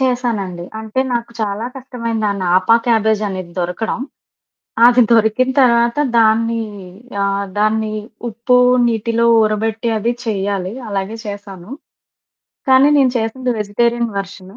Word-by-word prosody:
చేశానండి. 230 -9 -1 0.2
అంటే 220 +3 -2
నాకు 235 0 -2
చాలా 210 +1 -2
కష్టమైంది. 230 -4 -4
ఆ - - +1
నాపా 185 +6 +4
క్యాబేజు 220 -2 +2
అనేది 185 -3 -6
దొరకడం, 180 +7 -2 0.9
అది 245 0 +6
దొరికిన 225 +3 +3
తర్వాత 235 -2 +3 0.2
దాన్ని 230 +1 +2 0.6
ఆహ్, 200 0 -1
దాన్ని 215 0 +1 0.4
ఉప్పు 235 +3 +1 0.3
నీటిలో 230 0 0
ఊరబెట్టి 220 +2 0
అది 230 +3 0
చెయ్యాలి, 195 -2 -2 0.2
అలాగే 195 +2 -3
చేశాను. 200 0 -8 1.0
కానీ 265 +2 +6
నేను 265 -2 +4
చేసింది 250 +3 -2
వెజిటేరియన్ 235 +3 0
వెర్షను. 195 0 -8
220 Hz, 115 wpm, -17 LUFS, 200-235 Hz, 1.0 s, అది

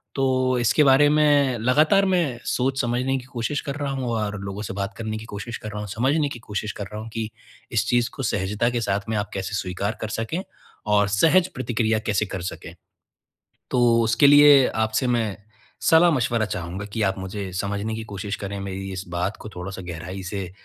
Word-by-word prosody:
तो 130 -1 +2
इसके 120 +6 +3
बारे 140 +1 +6
में 145 -4 +3
लगातार 155 - +4
मैं 170 -11 +1
सोच-समझने 130 0 0
की 125 - -7
कोशिश 125 +4 -1
कर 140 - -5
रहा 145 -1 -3
हूँ 130 -2 -3
और 105 -3 -2
लोगों 100 +1 -5
से 100 - -5
बात 100 +2 -3
करने 110 -1 -3
की 110 - -8
कोशिश 110 +2 -6
कर 110 - -7
रहा 105 - -5
हूँ, 105 - -5
समझने 140 +8 +1
की 120 - -7
कोशिश 105 -1 -4
कर 100 - -6
रहा 105 +1 -5
हूँ 115 - -8
कि 110 -1 -3 0.4
इस - - +1
चीज़ 120 -1 +2
को 135 - -5
सहजता 105 +2 0
के 120 -1 -1
साथ 100 -1 0
में 110 - 0
आप 105 0 -2
कैसे 95 +1 -3
स्वीकार 100 +3 -3
कर 110 - -3
सकें 115 +12 -3 0.5
और 105 -1 +4
सहज 165 - +4
प्रतिक्रिया 115 -3 0
कैसे 105 0 +1
कर 95 - -5
सकें? 90 - -6 1.0
तो 120 -2 +4
उसके 115 +5 +4
लिए 145 -2 +8
आपसे 110 +3 0
मैं 115 -5 0 0.5
सलाह-मशवरा 140 -9 +4
चाहूँगा 95 0 -5
कि 110 - -1
आप 95 -1 0
मुझे 95 +1 -5
समझने 100 +4 -2
की 110 0 -5
कोशिश 100 0 -5
करें, 100 0 -5
मेरी 95 0 -5
इस 95 0 -5
बात 90 +4 -2
को 110 - -8
थोड़ा-सा 95 +1 -6
गहराई 90 +2 -6
से 95 -1 -4
110 Hz, 200 wpm, -24 LUFS, 100-130 Hz, 1.0 s, लिए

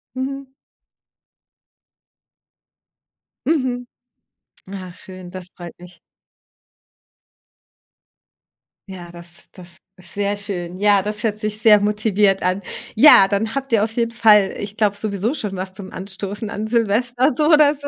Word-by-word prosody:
Mhm. 265 0 -5 2.9
Mhm. 255 -6 -1 1.1
Schön, 185 -1 -11
das 185 -1 -9
freut 175 -1 -9
mich. 180 0 -15 2.9
Ja, 180 -2 -9
das 170 0 -13
das 175 -2 -13 0.2
ist 185 - -11
sehr 205 0 -1
schön. 185 -4 -5
Ja, 205 0 +3
das 210 +3 -5
hört 215 -2 -1
sich 215 -1 -3
sehr 215 -1 +6
motiviert 210 -2 +1
an. 185 +2 0 0.3
Ja, 220 -5 +8
dann 210 +4 -2
habt 270 -1 -4
ihr 215 -2 +4
auf 225 +1 -3
jeden 230 0 -1
Fall, 210 -4 +4
ich 205 +1 -7
glaube, 210 -3 +1
sowieso 205 +3 -2
schon 210 -10 -5
was 185 0 -6
zum 190 0 -9
Anstoßen 200 +2 -5
an 210 +2 -4
Silvester 240 +4 +1
so 300 - +1
oder 300 -2 +5
so. 285 -1 -8
210 Hz, 130 wpm, -20 LUFS, 190-235 Hz, 2.9 s, Ja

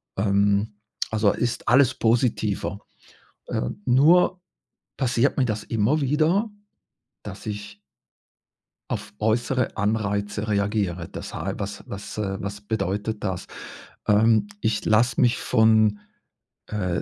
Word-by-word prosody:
Ähm, 100 +1 +1 0.3
also 110 -2 +2
ist 120 0 -2
alles 130 +1 +5
positiver. 110 -3 0 0.7
Äh, - - -1 0.2
nur 165 +8 +4 0.6
passiert 130 0 +1
mir 130 - +3
das 110 -1 -3
immer 115 +7 +1
wieder, 155 - +2 0.7
dass 100 +1 -9
ich 105 -1 -6 1.1
auf 100 - -4
äußere 120 +3 0
Anreize 105 0 -1
reagiere. 100 -4 -1
Das - - -8
hei - - -3
was 100 +1 -5
was 100 +2 -7
was 100 0 -4
bedeutet 105 0 -2
das? 95 -4 -3 0.6
Ähm, 110 - +4
ich 105 -1 0
lasse 115 +4 +3
mich 125 -1 +4
von, 110 -1 +3 0.7
äh, 90 -5 -2
110 Hz, 110 wpm, -24 LUFS, 100-120 Hz, 1.1 s, alles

